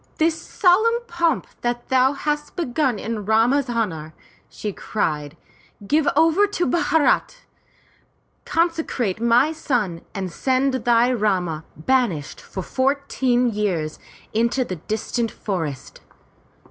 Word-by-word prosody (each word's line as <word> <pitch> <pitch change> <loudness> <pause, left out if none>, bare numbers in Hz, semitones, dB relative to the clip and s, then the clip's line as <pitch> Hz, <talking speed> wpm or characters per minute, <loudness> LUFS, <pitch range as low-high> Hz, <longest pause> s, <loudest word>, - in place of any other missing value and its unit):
"This 320 +1 +2
solemn 450 +5 +3
pomp 340 - 0 0.2
that 240 0 -2
thou 260 +1 +4
hast 295 +1 -3
begun 265 -6 0
in 220 0 -4
Rama's 235 +6 +2
honor,*' 165 -10 -2 0.3
she 210 -2 -5
cried, 150 -8 -3 0.5
give 295 +6 +2
over 325 +6 +4
to 375 -3 -1
Bharat! 335 - +1 1.0
Consecrate 320 - -1
my 235 +6 +4
son 240 - -1
and 190 -2 -3
send 260 +6 +1
thy 240 0 +3
Rama, 180 -8 0
banished 180 - 0
for 190 - -6
fourteen 260 -2 +1
years, 180 -7 -2 0.3
into 235 +4 +1
the 185 - -5
distant 220 +6 -2
forests. 165 - -5
245 Hz, 110 wpm, -22 LUFS, 200-295 Hz, 1.0 s, thou